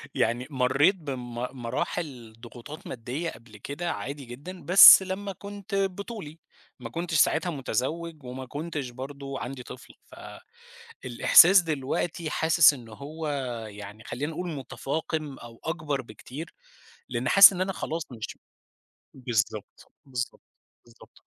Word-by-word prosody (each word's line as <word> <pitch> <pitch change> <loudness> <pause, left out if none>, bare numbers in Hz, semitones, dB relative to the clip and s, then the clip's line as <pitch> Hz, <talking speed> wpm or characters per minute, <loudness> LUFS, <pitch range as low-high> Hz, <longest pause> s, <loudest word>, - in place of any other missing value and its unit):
يعني 120 +3 0
مرّيت 135 +7 +3
بم 130 -8 -7 0.3
مراحل 120 -1 -4
ضغوطات 125 +7 -11
ماديّة 130 +8 -4
قبْل 115 -2 -15
كده 145 - -4
عادي 140 0 -6
جدًا 145 +10 -9
بس 190 +1 +10
لمّا 195 +1 -4
كُنت 200 +1 -8
بطُولي، 195 -4 -4 0.4
ما 120 -2 -7
كنتش 170 +5 -4
ساعتها 165 +4 +3
متزوّج، 150 +3 -3
وما 130 +1 -7
كُنتش 145 -1 -5
برضه 135 +2 -7
عندي 125 +1 -6
طفل، 130 - -12 0.9
فالإحساس 195 - +5
دلوقتي 155 +1 -3
حاسس 160 0 +5
إن 120 -5 -11
هو 150 +7 -7 0.4
يعني 105 +2 -10
خلّينا 145 +7 -4
نقول 180 +2 -5
متفاقِم 150 +1 -4
أو 115 -1 -12
أكبر 155 -4 -2
بكتير، 130 +7 -10 0.6
لإن - - -2
حاسس 200 0 +10
إن 180 - -4
أنا 190 +1 -1
خلاص 165 -1 -4
مش 110 -3 -7 0.8
بالضبط، 115 -4 -3
بالضبط، 125 -2 -5 0.4
بالضبط. 120 -1 -19
145 Hz, 125 wpm, -27 LUFS, 125-170 Hz, 0.9 s, بس